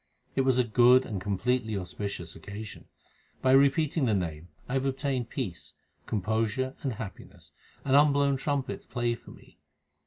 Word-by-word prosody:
It 135 Hz, -, +3 dB
was 130 Hz, -1 st, +2 dB
a 125 Hz, -, +4 dB
good 125 Hz, +3 st, +5 dB
and 100 Hz, -4 st, -4 dB
completely 110 Hz, +3 st, 0 dB
auspicious 90 Hz, -2 st, -5 dB
occasion. 100 Hz, +1 st, -9 dB, 0.6 s
By 130 Hz, -, +4 dB
repeating 140 Hz, +2 st, +4 dB
the 110 Hz, -4 st, +2 dB
Name 85 Hz, -3 st, -3 dB, 0.2 s
I 125 Hz, -, -4 dB
have 135 Hz, 0 st, +1 dB
obtained 135 Hz, -3 st, -1 dB
peace, 85 Hz, -, -5 dB, 0.3 s
composure, 110 Hz, +5 st, -1 dB
and 135 Hz, -4 st, -2 dB
happiness; 105 Hz, -2 st, -9 dB, 0.3 s
and 135 Hz, -1 st, +3 dB
unblown 140 Hz, -1 st, +4 dB
trumpets 140 Hz, -1 st, -2 dB
play 120 Hz, -2 st, 0 dB
for 115 Hz, -, -11 dB
me. -, -, -16 dB
125 Hz, 150 wpm, -28 LUFS, 105-135 Hz, 0.6 s, good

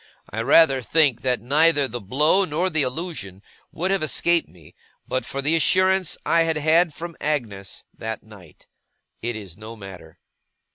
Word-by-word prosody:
I 110 Hz, -, -3 dB
rather 135 Hz, +1 st, +5 dB
think 140 Hz, -1 st, +2 dB
that 125 Hz, -4 st, 0 dB
neither 145 Hz, +2 st, +4 dB
the 120 Hz, -1 st, -6 dB
blow, 150 Hz, -, +2 dB
nor 180 Hz, +2 st, -1 dB
the 160 Hz, -2 st, +1 dB
allusion, 130 Hz, -, -5 dB, 0.3 s
would 185 Hz, +4 st, -2 dB
have 195 Hz, -, +1 dB
escaped 170 Hz, +2 st, +1 dB
me, 80 Hz, -4 st, -18 dB, 0.3 s
but 130 Hz, -, -2 dB
for 140 Hz, 0 st, -4 dB
the 155 Hz, +4 st, +3 dB
assurance 185 Hz, +2 st, +2 dB
I 165 Hz, -, +3 dB
had 165 Hz, -1 st, +1 dB
had 160 Hz, +3 st, +3 dB
from 170 Hz, +3 st, -8 dB
Agnes 110 Hz, -11 st, -3 dB
that 110 Hz, 0 st, -6 dB
night. 100 Hz, -7 st, -16 dB, 0.6 s
It 120 Hz, +1 st, -3 dB
is 100 Hz, -5 st, -9 dB
no 110 Hz, +2 st, -9 dB
matter. 95 Hz, -6 st, -12 dB
140 Hz, 160 wpm, -23 LUFS, 110-165 Hz, 0.6 s, rather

